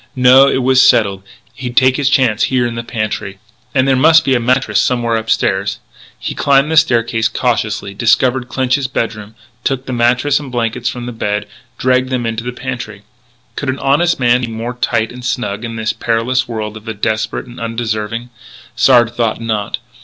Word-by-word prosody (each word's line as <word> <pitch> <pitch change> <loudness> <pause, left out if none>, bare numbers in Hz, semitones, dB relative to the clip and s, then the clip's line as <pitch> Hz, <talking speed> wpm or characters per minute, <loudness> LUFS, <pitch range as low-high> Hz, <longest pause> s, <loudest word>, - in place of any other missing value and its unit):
No; 130 +1 +6
it 130 -2 +1
was 130 0 +4
settled. 100 -3 +3 0.3
He'd 125 -1 -7
take 130 0 +5
his 140 -1 +1
chance 130 -7 +2
here 130 -2 +1
in 120 - -3
the 115 - -4
pantry.... 110 -4 -4 0.4
And 130 0 +3
there 135 - +3
must 160 +4 +5
be 135 - +2
a 125 - +2
mattress 130 +3 +1
somewhere 120 -2 +1
upstairs. 100 -3 0 0.4
He - - -5
climbed 140 +2 +2
the 160 - +1
staircase, 115 -6 +2
cautiously, 110 -5 -2
discovered 120 +4 +1
Clinch's 130 +1 0
bedroom, 110 -4 -4 0.3
took 135 -1 -1
the 130 - -5
mattress 125 +4 +2
and 140 -3 -9
blankets 120 0 -1
from 125 -1 -6
the 125 - -5
bed, 105 -2 -2 0.3
dragged 130 0 +1
them 130 -2 -1
to 115 - -4
the 125 - -4
pantry. 120 -5 -6 0.5
Could 140 - -3
any 130 - -1
honest 145 +6 +1
man 125 0 +3
be 125 - -2
more 115 +2 -5
tight 110 -2 -1
and 125 0 -10
snug 120 -3 -3
in 115 -1 -5
this 110 0 -2
perilous 120 +2 0
world 110 -2 -5
of 110 - -14
the 110 -1 -5
desperate 110 +1 -2
and 120 -1 -12
undeserving? 115 0 -3 0.4
Sard 120 -1 +4
thought 115 -2 -1
not. 110 -3 -2
120 Hz, 185 wpm, -15 LUFS, 110-130 Hz, 0.5 s, No